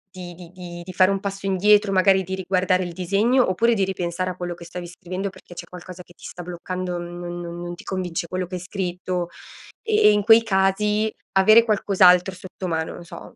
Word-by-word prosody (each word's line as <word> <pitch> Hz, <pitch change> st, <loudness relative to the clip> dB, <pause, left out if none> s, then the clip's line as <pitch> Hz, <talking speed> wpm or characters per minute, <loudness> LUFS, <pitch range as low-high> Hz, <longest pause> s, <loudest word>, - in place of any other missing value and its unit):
di 175 Hz, -2 st, -8 dB
di 175 Hz, -1 st, -13 dB
di 175 Hz, -1 st, -9 dB
di 185 Hz, -, -8 dB
fare 185 Hz, +1 st, +4 dB
un 195 Hz, -, -1 dB
passo 195 Hz, -1 st, -5 dB
indietro, 205 Hz, +2 st, +3 dB
magari 190 Hz, 0 st, +4 dB
di 190 Hz, +1 st, -4 dB
riguardare 185 Hz, 0 st, 0 dB
il 175 Hz, -1 st, -6 dB
disegno, 200 Hz, +7 st, +2 dB
oppure 230 Hz, +5 st, +2 dB
di 200 Hz, -3 st, +1 dB
ripensare 185 Hz, -1 st, -2 dB
a 180 Hz, -, -5 dB
quello 175 Hz, -1 st, -4 dB
che 170 Hz, 0 st, -12 dB
stavi 175 Hz, +1 st, -7 dB
scrivendo 185 Hz, +3 st, -5 dB
perché 175 Hz, -2 st, -15 dB
c'è 170 Hz, -, -7 dB
qualcosa 180 Hz, 0 st, -11 dB
che 175 Hz, -, -20 dB
ti -, -, -22 dB
sta 175 Hz, -, -8 dB
bloccando, 180 Hz, +1 st, -5 dB
non 175 Hz, 0 st, -7 dB
non 170 Hz, 0 st, -7 dB
non 175 Hz, 0 st, -5 dB
ti -, -, -13 dB
convince 180 Hz, -3 st, -3 dB
quello 185 Hz, 0 st, -3 dB
che 185 Hz, -, -6 dB
hai 180 Hz, -, -5 dB
scritto. 180 Hz, -2 st, -4 dB, 0.5 s
E 440 Hz, -1 st, -1 dB
e -, -, +6 dB
in 205 Hz, 0 st, +2 dB
quei 225 Hz, +1 st, +7 dB
casi 210 Hz, +2 st, +1 dB, 0.3 s
avere 215 Hz, +4 st, +7 dB
qualcos'altro 190 Hz, -3 st, +4 dB
sotto 185 Hz, 0 st, -8 dB
mano, 160 Hz, -1 st, -2 dB
non 175 Hz, -, -10 dB
so -, -, -11 dB
185 Hz, 215 wpm, -22 LUFS, 175-195 Hz, 0.5 s, quei